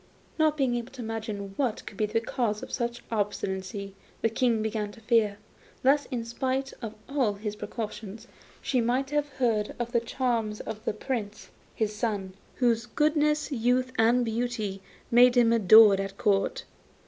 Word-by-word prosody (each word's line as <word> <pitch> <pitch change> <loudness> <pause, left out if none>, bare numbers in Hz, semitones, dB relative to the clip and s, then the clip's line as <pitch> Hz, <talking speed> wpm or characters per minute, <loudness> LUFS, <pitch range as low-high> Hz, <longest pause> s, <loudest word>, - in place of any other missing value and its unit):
Not 310 -1 +3
being 265 -4 +1
able 240 +2 -6
to 255 -3 -7
imagine 215 -3 -5
what 250 -6 -1
could - - -9
be 210 +1 0
the 225 +2 +1
cause 225 -2 -2
of - - -8
so 240 - 0
much 240 0 -7
obstinacy 200 -2 -3 0.3
the 225 - +4
King 230 -2 +1
began 215 -1 -2
to - - -14
fear, 215 -3 +2 0.5
lest, 280 +2 +4
in 240 -3 -3
spite 260 +3 -2
of 225 -3 -6
all 265 -7 +1
his 210 +1 -5
precautions, 210 +1 -6 0.4
she 255 -3 +1
might 255 +4 0
have 295 0 +1
heard 235 -6 0
of 240 -1 -3
the 240 - +3
charms 230 -3 -1
of 220 0 -7
the - - 0
Prince 215 -2 -5 0.2
his 215 -1 -1
son, 205 -4 -2 0.2
whose 240 -2 +1
goodness, 300 +3 +1
youth 255 +1 +1
and 240 +2 +4
beauty, 225 -4 -2 0.3
made 245 +1 +6
him 230 -1 +5
adored 215 -1 +7
at 195 0 -4
Court. 210 - +1
230 Hz, 170 wpm, -28 LUFS, 210-250 Hz, 0.5 s, adored